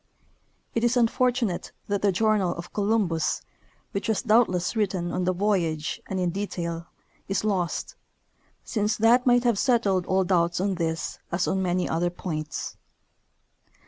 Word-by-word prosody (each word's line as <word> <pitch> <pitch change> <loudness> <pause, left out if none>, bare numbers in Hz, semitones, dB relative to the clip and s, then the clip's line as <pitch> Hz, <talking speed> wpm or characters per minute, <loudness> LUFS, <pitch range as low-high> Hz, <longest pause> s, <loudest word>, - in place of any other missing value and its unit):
It 230 - 0
is 240 +1 +3
unfortunate 240 -4 +1 0.2
that 200 -1 -1
the 205 - +3
journal 200 -2 +2
of 170 +1 -8
Co 210 - -1
lumbus, 195 -7 +1 0.5
which 200 - -3
Avas 220 +2 0
doubtless 215 -4 +3
written 185 -5 0
on 180 0 -1
the 185 - +3
voyage 175 -5 0
and 190 - -2
in 180 -1 +1
detail, 170 -3 -4 0.4
is 195 +1 -1
lost, 190 -5 -1 0.7
since 210 -1 0
that 240 +3 +4
might 245 0 +5
have 235 -5 +2
settled 205 -8 +2
all 190 0 +2
doubts 175 -2 +1
on 195 +1 +1
this 165 -2 -2
as 175 +2 0
on 190 - 0
man 180 -1 +1
3^ 180 - -1
other 170 +2 +1
.points. 155 -3 -5
190 Hz, 155 wpm, -26 LUFS, 175-215 Hz, 0.7 s, might